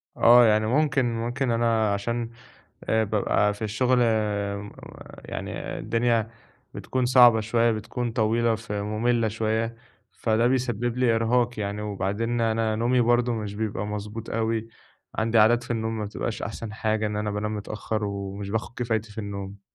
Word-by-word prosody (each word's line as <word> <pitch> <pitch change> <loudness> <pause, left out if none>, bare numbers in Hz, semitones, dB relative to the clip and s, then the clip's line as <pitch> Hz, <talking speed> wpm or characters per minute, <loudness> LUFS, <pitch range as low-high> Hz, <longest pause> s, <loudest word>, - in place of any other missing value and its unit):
آه، 120 +1 +7
يعني 110 -1 +3
ممكن 135 +1 +2
ممكن 120 +3 -1
أنا 115 -3 +2
عشان 115 +3 -2 0.5
آآ 110 0 +2
بابقى 105 -1 +1
في 105 - -14
الشُغل 120 +4 +1 0.6
م 105 0 -8 0.5
يعني - - -5
الدنيا 115 -1 +1 0.4
بتكون 130 -1 -2
صعبة 120 -2 +7
شوية، 115 +2 +2
بتكون 115 +2 -3
طويلة 115 +1 +1
فمُمِلّة 110 +2 -1
شوية، 110 +1 -1 0.4
فده 115 +1 +1
بيسبِّب 120 -2 -1
لي 120 -3 +3
إرهاق 120 +1 +1
يعني 105 0 -3
وبعدين 105 +4 -2
أنا 110 -1 +1
نومي 120 +3 +2
برضه 120 +1 +2
مش 105 -3 -4
بيبقى 105 -2 -3
مضبوط 105 +2 -6
أوي، 115 0 -1 0.5
عندي 115 +1 +1
عادات 120 +3 +5
في 120 - -5
النوم 110 -1 -2
ما 105 - -3
بتبقاش 105 - -4
أحسن 110 -2 -5
حاجة 110 0 0
إن 105 - -4
أنا 105 0 -2
بانام 105 +1 -2
متأخّر 105 +1 -4
ومش 100 0 -4
باخُد 110 +2 -3
كفايتي 110 -2 -1
في 105 - -17
النوم. 100 -1 -6
110 Hz, 150 wpm, -25 LUFS, 105-120 Hz, 0.6 s, آه